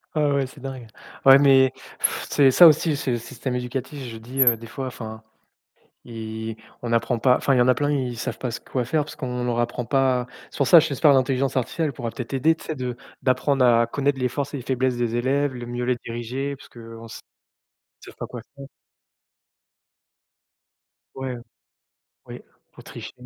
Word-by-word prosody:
Ah, 150 -1 +2
ouais, 135 -2 0
c'est 140 - -15
dingue. 130 -3 -7 0.4
Ouais 135 0 +10
mais 135 -2 +5 0.6
c'est 135 -2 +5
ça 175 +6 +9
aussi, 155 0 +3
c'est 140 -3 -2
le 120 - 0
système 125 +2 -5
éducatif, 130 +3 -5
je 115 - -8
dis, 125 +4 -3
heu, 120 -3 +6
des 115 +1 -11
fois, 130 +3 -5
enfin. 110 -3 -8 0.8
I 110 -1 -6 0.3
on 115 - -2
apprend 115 +1 +1
pas, 125 +2 +4
enfin, 135 - +1
il - - +2
y - - +4
en 120 - +3
a 130 - +6
plein, 145 +3 -1
ils 130 -4 -1
savent - - -4
pas 125 - -3
s 115 - -5
quoi 125 -3 -3
faire 150 +4 0
parce - - -10
qu'on 125 -2 -4
leur 120 -1 -1
apprend 120 0 -2
pas. 130 -2 +1 0.2
C'est - - -11
pour 140 - +1
ça, 175 - +8
j'espère, 150 -1 +3
l'intelligence 135 0 +1
artificielle 140 +4 -1
pourra 115 -1 -5
peut-être 125 +3 -7
aider, 155 +5 +3
tu - - -15
sais, 155 - -4
de 125 -2 -4 0.3
d'apprendre 130 0 +2
à 115 -1 +4
connaître 140 +2 -1
les 125 - 0
forces 140 +3 -4
et - - -2
les 130 - -7
faiblesses 130 0 0
des 120 -1 -1
élèves, 135 +3 0
le 120 -1 -6
mieux 120 +1 -4
les 125 - +1
diriger, 125 +4 -4
parce 135 - -16
qu'on 115 -1 -11
s - - -10 0.8
savent - - -12
pas - - -5
quoi - - -8
faire. 140 - -10 2.5
Ouais. 130 -2 -5 0.9
Oui, - - -9 0.3
pour - - -15
tricher. - - -9
130 Hz, 200 wpm, -23 LUFS, 120-135 Hz, 2.5 s, Ouais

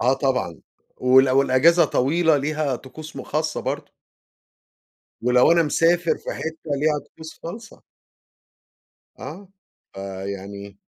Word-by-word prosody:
آه، 125 +2 +3
طبعًا، 130 - -1 0.4
وال 130 +1 +5
والأجازة 140 +6 +4
طويلة 160 +4 +2
ليها 145 -1 -1
طقوس 155 +5 -11
م - - -5
خاصة 155 0 -2
برضه. - - -4 1.3
ولو 125 +5 +5
أنا 170 -1 +4
مسافر 170 +2 +2
في - - -6
حتة 160 -1 -6
ليها 150 +1 +1
طقوس 160 0 -12
خاصة. 225 +7 -9 1.4
آه، 195 0 -9 0.5
آآ، 95 0 -6
يعني 100 0 -7
145 Hz, 115 wpm, -23 LUFS, 125-160 Hz, 1.4 s, وال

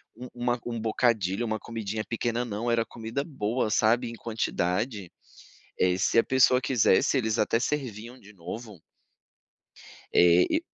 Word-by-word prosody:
um 125 +2 -9
uma 120 0 -1
um 115 -1 -4
bocadilho, 110 -2 0
uma 110 -1 -2
comidinha 110 -2 -4
pequena 120 +1 -2
não, 115 +2 -3
era 115 -1 +1
comida 115 +4 -5
boa, 120 -5 -2
sabe, 115 +3 +2
em - - -8
quantidade, 105 -2 -2 0.7
eh, 90 0 +2
se 100 - +1
a - - +4
pessoa 130 -1 +4
quisesse, 125 -2 +2
eles 110 -2 0
até 115 - +2
serviam 125 -3 -4
de 105 +1 -16
novo. 100 +1 -9 1.3
É, 90 0 +6
e - - +1
115 Hz, 145 wpm, -27 LUFS, 105-120 Hz, 1.3 s, É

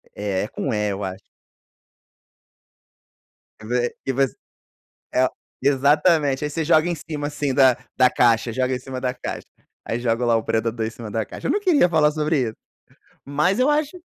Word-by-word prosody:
É 100 -1 -2
com 135 - -3
"e", 105 -1 0
eu 100 +1 -4
acho. 95 0 -5 2.4
Que 110 - -12
ve 120 0 -1
que 135 - 0
você 135 0 +1 0.8
é 130 - +4
o - - 0 0.3
exatamente. 145 +1 +3
Aí 150 - -1
você 160 +2 -2
joga 160 +1 +4
em 175 - -1
cima 150 -1 -5
assim 145 -2 -2
da 130 -3 +5 0.2
da 130 -1 +6
caixa, 115 -2 +2
joga 130 +1 0
em 125 - -4
cima 130 0 -7
da 125 -1 -1
caixa. - - -6 0.4
Aí 115 - -2
joga 120 0 0
lá 115 -1 +3
o 110 - 0
predador 115 0 -1
em - - -2
cima 115 -1 -9
da 110 0 -2
caixa. - - -7
Eu - - +2
não 415 - +1
queria 335 - +3
falar 155 -2 +3
sobre 150 -2 0
isso, 110 - -11 0.7
mas 150 - +1
eu 265 +3 +3
acho 300 +3 0
130 Hz, 185 wpm, -22 LUFS, 115-150 Hz, 2.4 s, da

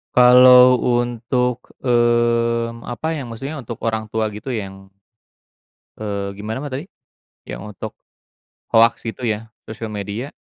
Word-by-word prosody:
Kalau 125 0 +8
untuk, 120 0 -1 0.2
mmm, 115 -1 +1
apa 155 +8 -4
yang 140 -6 -5
maksudnya 135 +6 -6
untuk 115 -1 -7
orang 110 -1 -2
tua 110 0 -1
gitu 105 +5 -8
yang, 95 -4 -6 1.1
eee, 100 -2 -4
gimana, 110 +4 -5
Mbak, 145 -1 -6
tadi? 145 +7 -5 0.6
Yang - - -7
untuk - - -7 0.8
hoax 115 0 +3
itu 120 +2 -6
ya 110 0 -2 0.2
sosial 110 0 -7
media? 105 +6 -5
115 Hz, 125 wpm, -20 LUFS, 110-125 Hz, 1.1 s, Kalau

